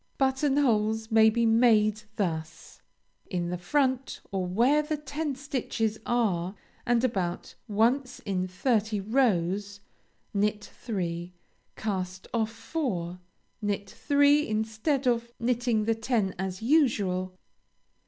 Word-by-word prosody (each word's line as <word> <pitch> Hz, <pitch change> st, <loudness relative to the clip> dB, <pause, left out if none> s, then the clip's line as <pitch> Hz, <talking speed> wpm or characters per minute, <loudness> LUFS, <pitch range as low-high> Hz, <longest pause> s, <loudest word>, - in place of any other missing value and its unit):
Button 270 Hz, +1 st, +2 dB
holes 220 Hz, -4 st, +1 dB
may 220 Hz, 0 st, +7 dB
be 235 Hz, +1 st, +1 dB
made 220 Hz, -2 st, +4 dB
thus: 160 Hz, -5 st, -4 dB, 0.5 s
in 175 Hz, -3 st, -2 dB
the 180 Hz, -, -2 dB
front 260 Hz, +6 st, 0 dB
or 190 Hz, -2 st, -1 dB
where 245 Hz, +11 st, +3 dB
the 300 Hz, 0 st, -2 dB
ten 295 Hz, 0 st, -3 dB
stitches 245 Hz, -5 st, -2 dB
are, 195 Hz, -6 st, 0 dB, 0.3 s
and 240 Hz, 0 st, +3 dB
about 190 Hz, -8 st, -2 dB
once 240 Hz, +5 st, +1 dB
in 185 Hz, -2 st, -2 dB
thirty 215 Hz, +2 st, 0 dB
rows, 200 Hz, -3 st, +1 dB, 0.5 s
knit 210 Hz, +1 st, 0 dB
three; 175 Hz, -5 st, -4 dB, 0.4 s
cast 190 Hz, -3 st, -3 dB
off 225 Hz, -2 st, 0 dB
four; 225 Hz, -, -3 dB, 0.4 s
knit 205 Hz, -1 st, -2 dB
three 285 Hz, +1 st, +3 dB
instead 220 Hz, +6 st, -1 dB
of 235 Hz, -1 st, +1 dB
knitting 240 Hz, -2 st, +1 dB
the 225 Hz, -, +3 dB
ten 225 Hz, -4 st, 0 dB
as 190 Hz, +1 st, -4 dB
usual. 200 Hz, -, +2 dB
220 Hz, 115 wpm, -28 LUFS, 190-250 Hz, 0.5 s, may